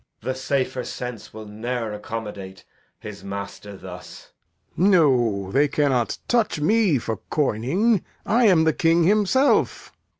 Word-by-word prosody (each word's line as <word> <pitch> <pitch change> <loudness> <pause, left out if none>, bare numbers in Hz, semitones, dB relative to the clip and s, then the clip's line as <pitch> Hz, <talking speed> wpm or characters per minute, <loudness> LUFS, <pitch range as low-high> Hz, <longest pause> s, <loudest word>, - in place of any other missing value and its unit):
The 130 - -2
safer 130 -1 -2
sense 120 -3 -7
will 110 0 -9
ne'er 115 +1 -4
accommodate 105 -3 -7 0.3
His 100 -2 -9
master 100 0 -7
thus. 90 -1 -11 0.4
Lear. 185 +5 +3
No, 120 - +2
they 145 +5 +3
cannot 140 -5 0
touch 230 -9 +1
me 200 -1 +3
for 115 -2 -4
coming; 155 - +1 0.2
I 235 +3 +3
am 180 -6 +5
the 160 -1 +2
King 165 +1 +2
himself. 215 - +2
130 Hz, 130 wpm, -23 LUFS, 105-170 Hz, 0.4 s, am